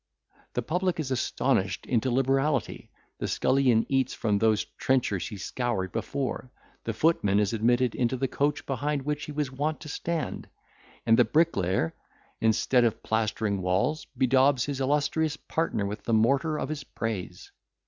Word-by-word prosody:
—The 125 - -1
public 180 +5 -1
is 140 -4 -3
astonished 120 -6 0
into 125 0 +1
liberality—the 135 +2 -1
scullion 130 -4 +2
eats 135 -1 0
from 105 -3 0
those 110 -1 +3 0.2
trenchers 120 -9 +1
he 110 -2 -7
scoured 110 -4 -2
before—the 130 -3 -5
footman 105 -8 +2
is 105 +1 +1
admitted 120 +2 +2
into 125 +1 0
the 135 +2 0
coach 145 +3 -1
behind 140 +1 -2
which 150 +1 -2
he - - -7
was 145 -2 -2
wont 150 +4 -2
to 155 - -8
stand—and 150 -7 -3
the - - +8
bricklayer, 100 - +1 0.5
instead 115 +3 +3
of 115 -2 0
plastering 110 -2 0
walls, 95 +13 0
bedaubs 130 0 +3
his 140 -2 -3
illustrious 150 +2 +1
partner 160 -11 -2
with 105 +1 -5
the 115 - 0
mortar 140 +8 +2
of 140 - -3
his 150 -2 -4
praise. 105 -9 -5
130 Hz, 145 wpm, -27 LUFS, 110-145 Hz, 0.5 s, the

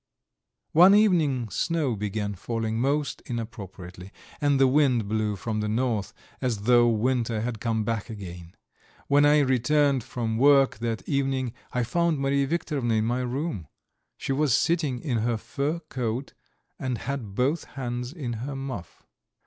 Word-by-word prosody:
One 180 +5 +7
evening 155 - +3
snow 160 -8 0
began 105 0 -3
falling 110 +3 -3
most 140 +1 0
inappropriately, 100 -6 -7 0.3
and 145 -2 +3
the 135 - +6
wind 130 -5 +3
blew 105 0 0
from 110 +2 -3
the 105 0 -1
north 115 -3 0 0.3
as 115 -6 -1
though 120 +1 +5
winter 115 -1 0
had 115 -1 -3
come 110 -1 0
back 110 +1 -2
again. 90 -5 -9 0.5
When 145 +1 +4
I 150 0 +5
returned 135 +1 +2
from 110 -2 -3
work 135 -3 +5
that 115 -1 -3
evening 135 -3 0 0.2
I 125 - 0
found 170 +6 +1
Mariya 140 0 +1
Viktorovna 140 -7 -1
in 110 0 +1
my 120 +2 0
room. 125 - -3 0.5
She - - -4
was 135 -3 +3
sitting 160 -7 +1
in 125 -7 -1
her 115 +1 0
fur 140 +8 -2
coat, 130 -4 -4 0.5
and 130 -2 -2
had 115 -6 -5
both 140 +7 +1
hands 125 -1 -5
in 140 -7 -5
her 135 +2 -4
muff. 135 -10 -7
125 Hz, 150 wpm, -26 LUFS, 110-140 Hz, 0.5 s, One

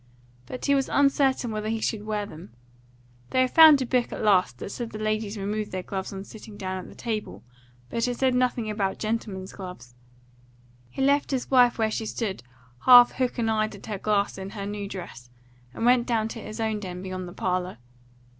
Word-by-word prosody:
But 255 - -6
he 280 - +3
was 270 -1 +1
uncertain 275 -3 +2
whether 215 0 -3
he 225 0 -1
should 215 -1 -2
wear 210 -1 -1
them. 155 - -12 0.7
They 255 - +2
had 255 - +1
found 310 -4 +8
a - - -3
book 245 0 0
at - - -5
last 185 - +3
that 195 - -7
said 235 +1 -5
the 215 - -7
ladies 215 0 -2
removed 210 +1 -3
their 185 -1 -4
gloves 190 0 -5
on 195 -1 -6
sitting 215 0 -12
down 185 -2 -5
at - - -15
table, 220 -3 -4 0.4
but 230 - -1
it 245 -1 -2
said 260 -1 +2
nothing 250 -2 +1
about 205 -2 -1
gentlemen's 210 -4 -4
gloves. 180 -11 -9 1.0
He 265 - -3
left 280 +1 +3
his 265 -1 -2
wife 245 -2 +5
where 220 -1 +1
she 220 0 -3
stood 210 -5 -3 0.4
half 245 -1 +9
hook 255 -1 -2
and 225 -2 +1
eyed 215 -1 0
at 195 - -12
her 210 -3 -4
glass 205 -1 0
in 190 0 -6
her 200 -1 -6
new 205 0 -4
dress, 175 -11 -9 0.4
and 225 - -3
went 245 0 +4
down 225 -3 0
to 225 - -7
his 215 +2 -8
own 220 -1 -1
den 180 -2 -7
beyond 185 -1 -5
the 175 - -9
parlour. 185 -3 -2
215 Hz, 205 wpm, -26 LUFS, 195-240 Hz, 1.0 s, half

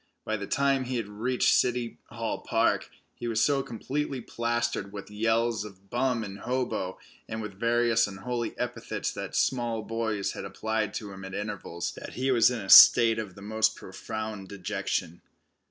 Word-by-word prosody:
By 110 - -1
the 100 -2 -5
time 135 +3 +2
he 125 +1 -3
had 115 -3 -3
reached 115 +5 +1
City 125 -1 +1
Hall - - -3
Park - - +1 0.2
he 120 - -6
was 115 -1 0
so 140 +1 +3
completely 135 +3 -3
plastered 120 -3 -2
with 100 0 -8
yells 115 0 +1
of 100 -2 -13
"bum" 120 -2 +1
and 100 -1 -7
"hobo," 125 -7 -2 0.3
and 110 - -4
with 105 -2 -5
various 115 -1 +3
unholy 115 +5 -4
epithets - - -3
that - - -6
small 120 -3 0
boys 110 -3 -2
had - - -7
applied 110 -1 -2
to 105 -2 -5
him 95 0 -9
at 95 0 -7
intervals, 105 -5 -4
that - - -8
he 130 +1 0
was 120 -2 +5
in 125 -3 -3
a 95 - -8
state 115 -2 +9
of 105 -4 -6
the 100 - -11
most 110 +1 +1
profound 105 +1 -6
dejection. 90 -3 -3
110 Hz, 170 wpm, -28 LUFS, 100-120 Hz, 0.3 s, state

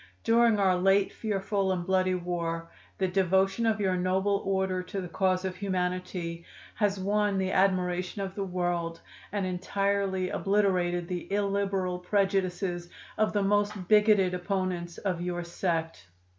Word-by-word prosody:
"'During 230 -1 +4
our 190 -2 +3
late 195 +2 +3
fearful 195 -2 -1
and 180 -2 -2
bloody 185 0 +2
war 170 -2 -3 0.3
the 190 - +1
devotion 190 +4 +2
of 220 -2 +1
your 190 -2 +1
noble 190 +3 +1
order 190 -1 0
to 190 +2 -5
the 180 - -4
cause 185 +1 0
of 185 -1 -3
humanity 180 -3 -3 0.3
has 205 -2 0
won 205 +1 +1
the 190 0 0
admiration 185 0 +1
of 190 -1 -5
the 200 - -3
world, 175 -2 -2 0.3
and 205 -2 -1
entirely 190 +1 -1
obliterated 185 -4 +1
the 180 0 -5
illiberal 195 -2 0
prejudices 185 -2 0 0.3
of 215 - +3
the 205 -1 +1
most 205 -1 0
bigoted 210 -3 +5
opponents 180 -2 -2
of 185 -4 -2
your 175 0 -2
sect. 165 - -3
190 Hz, 145 wpm, -28 LUFS, 180-200 Hz, 0.3 s, bigoted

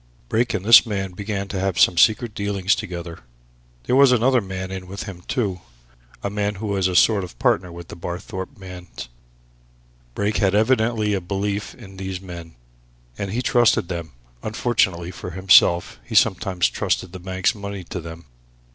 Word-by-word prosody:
Brake 120 +2 +1
and 95 - -4
this 115 0 +9
man 100 -5 -3
began 100 +1 -4
to 95 - -3
have 95 -1 -1
some 90 - +5
secret 110 +5 +3
dealings 100 -2 0
together. 90 -5 -6 0.6
There 125 - 0
was 135 -1 +6
another 125 +1 +3
man 95 -1 -6
in 95 -1 -6
with 100 +2 -7
them, 95 -4 -8
too 100 -9 -2 0.6
a 100 - -1
man 105 0 -1
who 105 +3 -6
was 100 -3 +1
a 90 - -3
sort 100 +2 +4
of 85 -9 -9
partner 90 +7 +1
of 85 -1 -9
the - - -9
Barthorpe 95 +7 -6
man's. 90 -8 -10 1.1
Brake 105 +1 0
had 100 -1 +2
evidently 110 -1 +2
a 95 - -1
belief 100 +3 -3
in 95 0 -13
these 95 -1 -5
men, 85 -4 -10 0.6
and 100 - -4
he 120 +4 -2
trusted 120 -9 +3
them 85 -5 -5 0.3
unfortunately 100 -6 0
for 90 - -8
himself 85 -4 +4
he - - -8
sometimes 95 -2 +3
trusted 90 - -2
the 95 - -7
bank's 95 +2 0
money 100 -3 -7
to 90 +1 -6
them. 80 0 -10
95 Hz, 175 wpm, -22 LUFS, 90-105 Hz, 1.1 s, this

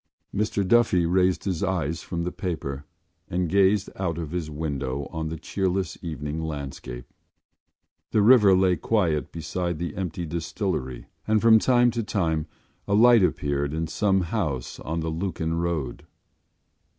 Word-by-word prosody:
Mr 100 -1 0
Duffy 110 -6 +4
raised 90 +1 +2
his 95 -4 -2
eyes 85 -5 -1
from 85 -2 -4
the 90 - -2
paper 75 -7 -4 0.4
and 90 0 0
gazed 100 +2 +3
out 85 -4 -2
of 80 -3 -5
his 85 -3 -3
window 70 -3 -3
on 80 -1 -3
the 80 - -5
cheerless 95 -1 -2
evening 75 -1 -4
landscape. 70 -5 -6 1.0
The 105 - +2
river 105 -4 +7
lay 90 -2 +3
quiet 85 -9 0
beside 85 +1 -3
the 85 -1 -4
empty 90 -2 -3
distillery 80 - -3 0.2
and 110 0 +3
from 110 0 +6
time 120 0 +4
to 120 0 -2
time 80 -8 -1 0.4
a 100 - +2
light 120 +1 +7
appeared 70 -3 0
in 80 +1 -1
some 95 +2 +1
house 85 - -3
on 80 +1 -3
the 80 - -2
Lucan 80 -1 -2
road. 85 -5 -3
85 Hz, 150 wpm, -25 LUFS, 80-95 Hz, 1.0 s, river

